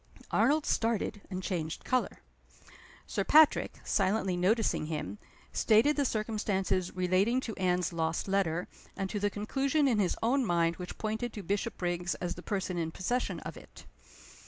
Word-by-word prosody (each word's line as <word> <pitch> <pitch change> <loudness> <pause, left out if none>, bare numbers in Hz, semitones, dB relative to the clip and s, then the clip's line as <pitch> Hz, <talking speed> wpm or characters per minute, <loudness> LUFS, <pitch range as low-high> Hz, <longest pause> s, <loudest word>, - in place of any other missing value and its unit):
Arnold 285 +8 +3
started, 225 -2 0
and 185 -1 -4
changed 165 -5 -3
color. 255 -1 -1 0.8
Sir - - -1
Patrick 310 0 +5
(silently 195 -2 +1
noticing 190 -2 +1
him) 125 - -4 0.3
stated 230 +8 +4
the 285 - +1
circumstances 210 -5 -1
relating 185 +7 +2
to 225 -5 -5
Anne's 180 -2 +1
lost 165 +1 -1
letter, 185 -3 0 0.3
and 195 0 -2
to 205 - -2
the 205 +1 +1
conclusion 270 +8 0
in 235 -5 +2
his 190 -3 +1
own 260 +4 +3
mind 170 -4 +1
which 180 -1 -7
pointed 220 +2 -3
to 205 - -6
Bishopriggs 175 -3 -2
as 175 -1 -3
the 180 - -10
person 185 -2 -2
in 165 -1 -1
possession 235 +9 -2
of - - -7
it. - - -14
195 Hz, 155 wpm, -31 LUFS, 180-225 Hz, 0.8 s, Patrick